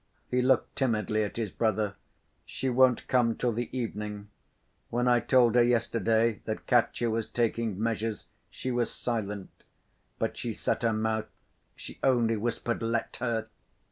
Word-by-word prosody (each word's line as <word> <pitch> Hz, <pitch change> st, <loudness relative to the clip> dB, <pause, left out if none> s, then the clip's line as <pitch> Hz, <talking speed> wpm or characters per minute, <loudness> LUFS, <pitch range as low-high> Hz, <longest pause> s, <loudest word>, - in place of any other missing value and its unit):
He 125 Hz, 0 st, +2 dB
looked 130 Hz, 0 st, +2 dB
timidly 110 Hz, -4 st, +1 dB
at 105 Hz, -, -5 dB
his 110 Hz, -5 st, -2 dB
brother. 110 Hz, -3 st, 0 dB, 0.5 s
"She 130 Hz, -, -3 dB
won't 125 Hz, -1 st, +4 dB
come 120 Hz, -3 st, +3 dB
till 125 Hz, -, 0 dB
the 120 Hz, +2 st, -3 dB
evening. 105 Hz, -3 st, -4 dB, 0.6 s
When 120 Hz, +1 st, 0 dB
I 120 Hz, -1 st, +5 dB
told 120 Hz, 0 st, +4 dB
her 120 Hz, -, +6 dB
yesterday 115 Hz, -1 st, +2 dB
that 110 Hz, -, -4 dB
Katya 120 Hz, -1 st, +2 dB
was 110 Hz, 0 st, -1 dB
taking 115 Hz, -4 st, -1 dB
measures, 110 Hz, -1 st, -2 dB, 0.2 s
she 130 Hz, -, -4 dB
was 120 Hz, -1 st, 0 dB
silent, 105 Hz, -5 st, -3 dB, 0.7 s
but -, -, -2 dB
she -, -, -3 dB
set -, -, -1 dB
her 115 Hz, -, +2 dB
mouth. 110 Hz, 0 st, -1 dB, 0.5 s
She -, -, -10 dB
only 120 Hz, -4 st, +3 dB
whispered, 120 Hz, +2 st, -2 dB
'Let 115 Hz, 0 st, -1 dB
her! 115 Hz, -3 st, -2 dB
115 Hz, 150 wpm, -29 LUFS, 110-120 Hz, 0.7 s, her